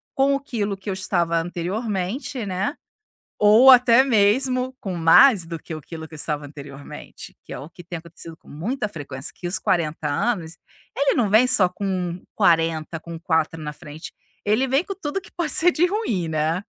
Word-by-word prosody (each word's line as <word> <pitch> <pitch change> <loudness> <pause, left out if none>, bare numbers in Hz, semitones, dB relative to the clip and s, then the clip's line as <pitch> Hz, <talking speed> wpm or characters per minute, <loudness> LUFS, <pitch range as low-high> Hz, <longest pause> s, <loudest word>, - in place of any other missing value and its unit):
com 275 +1 +3
o - - -1
quilo 210 -7 -3
que 195 +1 -8
eu - - -1
estava 175 -3 0
anteriormente, 195 - -3
né. 195 - -2 0.6
Ou 220 +6 +7
até 250 -1 +7
mesmo 255 +3 +2
com 190 -3 -5
mais 175 +4 +6
do 165 -1 -6
que 160 - -8
o 155 - -8
quilo 160 +1 -9
que 160 - -19
eu - - -7
estava 150 -1 -4
anteriormente, 140 -1 -11
que - - -14
é - - -5
o 150 - -9
que 175 - -14
tem 170 0 -6
acontecido 165 -1 -11
com - - -27
muita 210 - -3
frequência. 140 -7 -8
Que 180 - -10
os 175 - -1
40 155 -3 -1
anos, 165 0 -1 0.4
ele 280 0 +2
não 225 -5 +1
vem 220 +5 +5
só 230 -8 +4
com 180 -2 -3
40, 165 -1 +1
com 165 0 -9
4 160 -2 0
na 150 0 -5
frente, 150 +1 -10 0.3
ele 220 +6 +2
vem 275 +7 +2
com 395 - -4
tudo 335 0 -4
que - - -17
pode 340 -3 -3
ser 355 +2 +4
de 335 +2 +2
ruim, 235 - -2
né. 160 +4 -1
185 Hz, 195 wpm, -22 LUFS, 165-245 Hz, 0.6 s, Ou